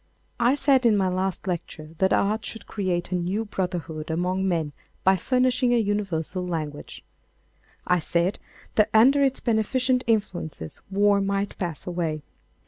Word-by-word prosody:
I 245 +3 +4
said 275 -3 +3
in 225 -3 +4
my 190 -2 +2
last 185 +1 -2
lecture 160 -4 -5
that 190 0 +3
art 215 +2 +1
would 225 - -11
create 185 -4 -2
a - - +1
new 185 +5 -1
brotherhood 175 -6 -4
among 180 +4 0
men 160 -5 -1 0.3
by 190 +1 +5
furnishing 250 +4 +2
a - - +4
universal 195 -5 -1
language. 155 -4 -5 0.8
I 180 0 +3
said 170 +4 0 0.3
that 215 0 +3
under 265 +6 +6
its 270 -1 +2
beneficent 250 +3 +1
influences 175 - -2
war 200 +1 +3
might 200 +1 -1
pass 170 -5 -4
away. 165 -4 -2
190 Hz, 145 wpm, -25 LUFS, 175-220 Hz, 0.8 s, under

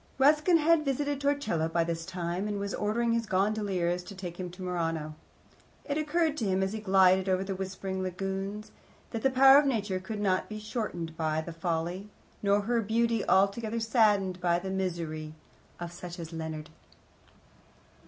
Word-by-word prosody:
Ruskin 300 +5 +5
had 325 0 +3
visited 285 0 -1
Torcello 280 - 0
by 170 +1 +1
this 165 0 -3
time, 180 +1 -3
and 205 -1 -2
was 200 0 -3
ordering 230 +3 0
his 230 -1 0
gondoliers 190 -3 0
to 200 - -9
take 180 -2 -7
him 180 -1 -4
to 180 +2 -10
Murano. 165 -4 -2 0.7
It 285 - -2
occurred 310 0 +1
to 230 - -1
him, 190 -1 +1
as 190 +2 -2
he 220 - -3
glided 190 -2 +4
over 185 0 +2
the 195 0 -3
whispering 190 0 -4
lagoons, 195 +3 -4 0.4
that 225 - -3
the 270 - +3
power 270 +1 +8
of 290 - +1
Nature 205 -7 0
could 205 +3 -6
not 190 -3 +1
be 215 - -5
shortened 210 -7 -4
by 155 -1 0
the 170 +1 -7
folly, 170 +4 -3 0.3
nor 200 0 +3
her 230 +3 +1
beauty 230 +1 +1
altogether 215 +4 +2
saddened 210 -5 +2
by 175 -1 +2
the 190 +2 -4
misery, 165 -5 -3 0.4
of 175 -1 -5
such 175 0 -8
as 165 -1 -7
Leonard. 160 -1 -5
195 Hz, 175 wpm, -29 LUFS, 175-225 Hz, 0.7 s, power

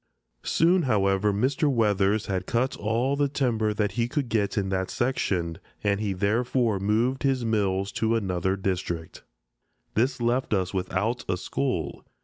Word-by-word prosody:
Soon, 175 +3 +3
however, 100 -1 +2
Mr. 130 +8 +1
Weathers 105 -3 +2
had 95 -3 -2
cut 125 +3 0
all 115 +6 0
the 145 0 +2
timber 120 -6 0
that 105 -1 0
he 115 +4 0
could 135 -1 -2
get 105 -3 0
in 95 -2 0
that 95 -1 -1
section, 90 -10 -1 0.2
and 100 -1 +1
he 105 -2 -1
therefore 110 +2 +1
moved 115 +6 +1
his 135 -3 +1
mills 100 -3 0
to 115 0 +1
another 95 -3 0
district. 90 -4 -3 0.7
This 125 +4 +1
left 120 -1 +1
us 95 -1 -1
without 100 +6 -1
a 90 - +1
school. 95 - -2
105 Hz, 150 wpm, -26 LUFS, 95-125 Hz, 0.7 s, Soon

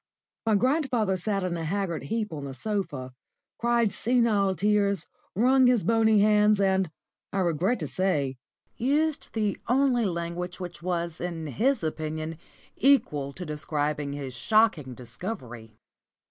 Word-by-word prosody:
My 220 - +4
grandfather 250 -4 +1
sat 195 +2 -1
in 180 -2 -1
a 165 - -4
haggard 180 0 -2
heap 215 -4 -2
on 145 -2 -5
the 135 -1 -6
sofa, 145 -8 -3 0.5
cried 235 -2 +2
senile 220 -6 +2
tears, 200 -2 +1 0.3
wrung 255 +5 +5
his 245 -4 +3
bony 220 -2 +4
hands, 210 0 +4
and, 190 -2 +2 0.4
I - - -3
regret 180 +7 +1
to 155 - -2
say, 145 -8 -1 0.4
used 295 +5 0
the 210 -3 -1
only 250 -2 +3
language 175 0 -3
which 175 -2 -7
was 170 -2 -2
in 170 -2 -4
his 230 - +1
opinion 155 0 -3 0.4
equal 150 - +2
to 180 - -7
describing 150 -1 -2
his 140 -3 -5
shocking 155 - +2
discovery. 120 - -7
190 Hz, 135 wpm, -27 LUFS, 155-220 Hz, 0.5 s, wrung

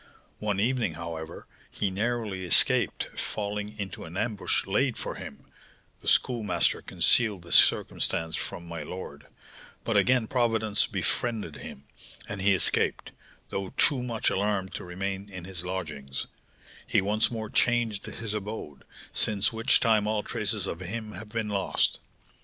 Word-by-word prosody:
One 105 -2 0
evening, 115 -6 +1
however, 85 -1 -6 0.2
he 100 -2 -1
narrowly 105 -2 -1
escaped 90 - +4 0.2
falling 105 0 -3
into 95 -4 -5
an 85 +3 -7
ambush 105 -1 0
laid 120 +5 +1
for - - -3
him - - -9 0.5
(the - - -10
Schoolmaster 105 -9 +2
concealed 105 -7 +2
this 85 - +1
circumstance 80 0 +3
from 85 - -4
my 85 -2 -5
lord), 75 -3 -7 0.6
but - - +1
again 125 -2 +4
Providence 110 -3 +1
befriended 110 -11 -2
him, 70 - -9 0.4
and 100 -2 -5
he 100 0 +5
escaped, - - +1 0.4
though 95 -1 -4
too 135 -4 +4
much 120 -3 0
alarmed 100 -1 0
to - - -5
remain 95 +3 -4
in 90 -3 -8
his 90 -2 -6
lodgings; 80 -7 -4 0.6
he - - +4
once 105 +3 +2
more 110 -2 -5
changed 120 -4 +2
his 110 -2 -3
abode, 105 -8 -5 0.3
since 105 0 +2
which 115 0 +3
time 110 -2 +3
all 105 -1 0
traces 105 -2 -1
of 85 - -4
him 105 +4 -5
have 110 0 -9
been 110 -1 -2
lost. 100 -2 +1
105 Hz, 145 wpm, -28 LUFS, 90-110 Hz, 0.6 s, he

